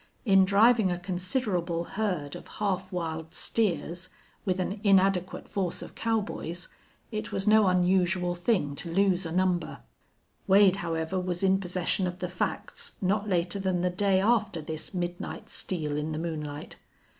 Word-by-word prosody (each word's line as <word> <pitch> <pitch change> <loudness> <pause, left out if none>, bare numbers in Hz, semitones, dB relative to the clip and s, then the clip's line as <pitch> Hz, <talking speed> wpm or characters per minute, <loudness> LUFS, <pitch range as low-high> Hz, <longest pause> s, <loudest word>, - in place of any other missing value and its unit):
In 195 -3 +6
driving 215 +1 +5
a 175 - -1
considerable 180 -1 -1
herd 180 -7 -2
of - - -10
half 190 -2 -2
wild 160 -2 -4
steers, 185 -5 -1 0.4
with 185 -2 0
an 195 +3 -2
inadequate 190 -2 +2
force 185 -4 -2
of - - -10
cowboys, 200 -6 -2 0.4
it 215 -1 -4
was 195 - -1
no 215 -1 +6
unusual 180 0 +2
thing 175 -5 0
to 170 - -5
lose 185 -1 +2
a - - -6
number. 180 0 0 0.7
Wade, 195 -1 +6
however, 165 0 -2
was 180 0 -2
in 190 0 +4
possession 180 0 0
of 180 0 -5
the 180 - -3
facts 180 - -3
not 200 +2 0
later 175 +1 0
than 185 -2 0
the 180 0 +1
day 195 +1 +2
after 215 -3 +2
this 155 0 -5
midnight 175 -2 -4
steal 155 -5 -2
in 150 +1 -2
the - - -3
moonlight. 150 -3 -5
185 Hz, 155 wpm, -28 LUFS, 175-195 Hz, 0.7 s, In